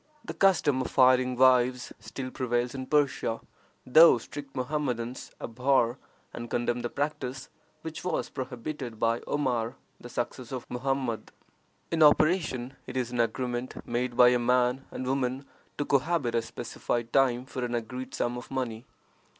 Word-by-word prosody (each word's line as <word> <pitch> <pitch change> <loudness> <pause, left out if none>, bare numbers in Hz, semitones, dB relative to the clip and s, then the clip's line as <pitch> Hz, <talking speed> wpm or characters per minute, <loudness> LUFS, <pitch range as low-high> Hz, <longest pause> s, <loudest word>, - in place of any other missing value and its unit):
The - - -5
custom 155 -9 +3
of - - -5
hiring 130 -1 +5
wives 125 -1 +3
still 130 +5 -6
prevails 120 -2 -1
in 130 -1 -5
Persia, 140 -6 +1 0.5
though 155 +2 +8
strict 140 +4 -9
Mohammedans 130 -3 -2
abhor 125 +1 +1 0.3
and 120 0 -6
condemn 120 0 0
the 120 - -2
practice, 135 -3 -3 0.3
which 160 0 -6
was 180 - -1
prohibited 125 -1 -6
by 115 +1 +2
Omar, 125 -5 0 0.2
the 120 - -10
successor 125 +1 -4
of 125 - -6
Mohammed. 130 -2 -2 0.6
In 165 -1 +1
operation, 150 -4 +4
it 130 0 -5
is 125 -2 -1
an 120 - -3
agreement 120 +1 -1
made 120 0 -2
by 125 0 +8
a 125 0 +3
man 125 +2 +2
and 130 - -5
woman 130 +1 -1 0.3
to 145 - -1
cohabit 140 -2 +1
a 115 - +2
specified 120 +1 -4
time 130 -2 +3
for 130 -1 -5
an 120 0 -1
agreed 125 +3 -5
sum 120 +1 -1
of 120 - -12
money. 125 -4 -4
125 Hz, 150 wpm, -28 LUFS, 120-135 Hz, 0.6 s, though